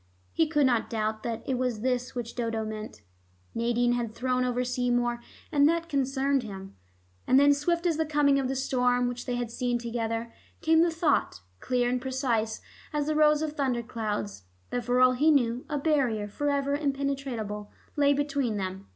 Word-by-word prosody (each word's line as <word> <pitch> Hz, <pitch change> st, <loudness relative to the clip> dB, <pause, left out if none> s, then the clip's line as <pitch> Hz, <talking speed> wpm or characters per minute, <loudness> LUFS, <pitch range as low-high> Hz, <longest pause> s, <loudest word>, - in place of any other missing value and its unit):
He 325 Hz, -, +2 dB
could 295 Hz, -2 st, +2 dB
not 240 Hz, -3 st, +1 dB
doubt 215 Hz, -1 st, -2 dB
that 230 Hz, -1 st, -4 dB
it 255 Hz, -2 st, 0 dB
was 250 Hz, -4 st, -1 dB
this 250 Hz, 0 st, -1 dB
which 235 Hz, -1 st, -4 dB
Dodo 230 Hz, -2 st, -2 dB
meant. 215 Hz, -, -7 dB, 0.5 s
Nadine 240 Hz, +1 st, +1 dB
had 235 Hz, -2 st, -2 dB
thrown 255 Hz, 0 st, 0 dB
over 250 Hz, 0 st, 0 dB
Seymour 245 Hz, -1 st, 0 dB, 0.3 s
and 290 Hz, -1 st, +5 dB
that 335 Hz, 0 st, -1 dB
concerned 275 Hz, -1 st, +1 dB
him. 195 Hz, -4 st, -9 dB, 0.5 s
And 260 Hz, -, +6 dB
then 285 Hz, 0 st, +6 dB
swift 340 Hz, +5 st, 0 dB
as 335 Hz, -3 st, +2 dB
the 320 Hz, -, +1 dB
coming 290 Hz, -2 st, +3 dB
of 265 Hz, -, -1 dB
the 265 Hz, -, -2 dB
storm 250 Hz, -2 st, +1 dB
which 245 Hz, +1 st, -5 dB
they 245 Hz, -, -1 dB
had 240 Hz, -2 st, -3 dB
seen 245 Hz, 0 st, -1 dB
together, 230 Hz, -1 st, -3 dB, 0.3 s
came 320 Hz, 0 st, +4 dB
the 340 Hz, -, +4 dB
thought, 320 Hz, -, 0 dB, 0.2 s
clear 250 Hz, -1 st, 0 dB
and 250 Hz, 0 st, 0 dB
precise 250 Hz, -4 st, -1 dB, 0.3 s
as 295 Hz, -2 st, -1 dB
the 310 Hz, +1 st, -1 dB
rows 300 Hz, 0 st, +4 dB
of 310 Hz, -, -2 dB
thunder 255 Hz, -5 st, 0 dB
clouds, 205 Hz, -, -4 dB, 0.3 s
that 245 Hz, -1 st, -2 dB
for 245 Hz, +1 st, +2 dB
all 255 Hz, 0 st, +6 dB
he 285 Hz, +5 st, +3 dB
knew 245 Hz, -4 st, +2 dB
a 295 Hz, -, -1 dB
barrier 270 Hz, -8 st, +1 dB
forever 280 Hz, +4 st, -1 dB
impenetrable 275 Hz, -7 st, -3 dB, 0.2 s
lay 285 Hz, -1 st, +4 dB
between 280 Hz, -6 st, 0 dB
them. 190 Hz, 0 st, -5 dB
250 Hz, 185 wpm, -28 LUFS, 230-280 Hz, 0.5 s, And